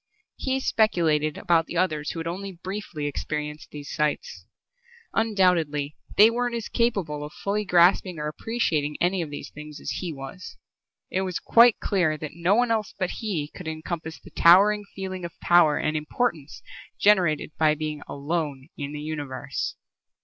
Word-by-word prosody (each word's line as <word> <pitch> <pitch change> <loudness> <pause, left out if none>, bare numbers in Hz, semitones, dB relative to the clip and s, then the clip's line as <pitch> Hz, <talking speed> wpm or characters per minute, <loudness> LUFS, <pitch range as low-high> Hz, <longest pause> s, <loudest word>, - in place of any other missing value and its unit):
He 265 0 -1
speculated 160 - +2
about 165 -2 +2
the 175 - -4
others 155 -5 0
who 165 - -4
had 165 - -4
only 190 +4 -4
briefly 180 -3 -5
experienced 150 +1 -4
these 145 -1 -8
sights. 150 -1 -2 0.7
Undoubtedly 175 -9 +1 0.2
they 215 +2 +8
weren't 240 0 -1
as 230 -2 -4
capable 190 -11 0
of 150 - -7
fully 205 +1 -2
grasping 180 0 +4
or 150 0 -3
appreciating 155 -4 -1
any 180 +1 +1
of 160 - -4
these 145 - -7
things 150 0 -10
as - - -4
he 180 -3 -3
was. 135 +5 -9 0.5
It 190 - 0
was 185 -3 -2
quite 235 -1 +5
clear 175 -6 +1
that 155 -1 -7
no 170 +4 +2
one 240 0 +2
else 220 -3 -1
but 185 -2 -1
he 170 -10 -3
could 180 - -9
encompass 160 0 -5
the - - -15
towering 205 +5 +6
feeling 185 -2 -5
of 170 - -8
power 170 -4 +5
and 155 0 -1
importance 155 - -2 0.4
generated 180 -8 +3
by 155 -1 +4
being 155 -1 -4
alone 145 -1 -3
in 145 -1 -5
the 150 - -5
Universe. 145 -3 -4
165 Hz, 165 wpm, -25 LUFS, 150-195 Hz, 0.7 s, they